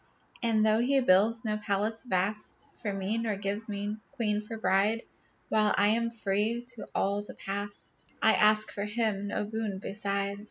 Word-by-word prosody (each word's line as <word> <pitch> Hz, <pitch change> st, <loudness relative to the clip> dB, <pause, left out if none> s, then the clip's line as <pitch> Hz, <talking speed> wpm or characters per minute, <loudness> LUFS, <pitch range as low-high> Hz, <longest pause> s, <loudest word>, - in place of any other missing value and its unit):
And 225 Hz, -2 st, +2 dB
though 215 Hz, 0 st, +4 dB
he 270 Hz, +3 st, +3 dB
builds 225 Hz, +1 st, +3 dB
no 215 Hz, -1 st, 0 dB
palace 210 Hz, +2 st, 0 dB
vast 210 Hz, -2 st, -1 dB
For 210 Hz, -, -2 dB
me, 195 Hz, +3 st, -1 dB
nor 225 Hz, -3 st, -1 dB
gives 205 Hz, +3 st, -2 dB
me 205 Hz, +1 st, -3 dB, 0.2 s
queen 210 Hz, -2 st, 0 dB
for 225 Hz, +1 st, -7 dB
bride, 215 Hz, +2 st, +2 dB, 0.5 s
While 215 Hz, -1 st, +3 dB
I 205 Hz, +1 st, +5 dB
am 230 Hz, +2 st, +2 dB
free 225 Hz, +2 st, 0 dB
to 240 Hz, -4 st, -5 dB
all 200 Hz, +1 st, +1 dB
the 205 Hz, -, -11 dB
past, 200 Hz, +1 st, -3 dB
I -, -, +5 dB
ask 215 Hz, 0 st, +4 dB
from 200 Hz, +1 st, -4 dB
him 210 Hz, -2 st, 0 dB
no 205 Hz, -, -1 dB
boon 215 Hz, -2 st, -3 dB
beside. 200 Hz, 0 st, -2 dB
210 Hz, 170 wpm, -29 LUFS, 200-225 Hz, 0.5 s, I